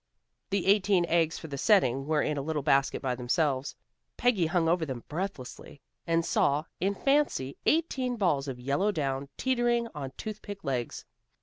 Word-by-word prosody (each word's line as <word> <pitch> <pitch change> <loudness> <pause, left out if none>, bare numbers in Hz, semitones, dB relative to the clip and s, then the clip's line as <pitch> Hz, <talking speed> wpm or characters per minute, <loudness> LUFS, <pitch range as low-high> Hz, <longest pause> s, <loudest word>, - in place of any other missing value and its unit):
The 200 -2 0
eighteen 195 -2 +4
eggs 165 -1 +1
for 160 - -8
the 140 -2 -6
setting 135 - +3
were 155 -1 +2
in 150 - -1
a 140 - -2
little 150 0 -2
basket 140 -1 +2
by 130 -2 0
themselves. 130 +2 0 0.4
Peggy 220 -9 +2
hung 165 0 +1
over 170 0 +2
them 130 -6 -5
breathlessly, 155 -5 -6 0.3
and 165 0 +2
saw 145 -1 +2 0.2
in 195 +3 0
fancy 275 - +1
eighteen 270 -6 +1
balls 160 -10 +1
of 130 -2 -5
yellow 140 +11 +1
down, 140 -5 -2
teetering 240 -2 +1
on 140 -4 -5
toothpick 205 -2 -7
legs. 125 -4 -3
160 Hz, 165 wpm, -29 LUFS, 140-200 Hz, 0.4 s, eighteen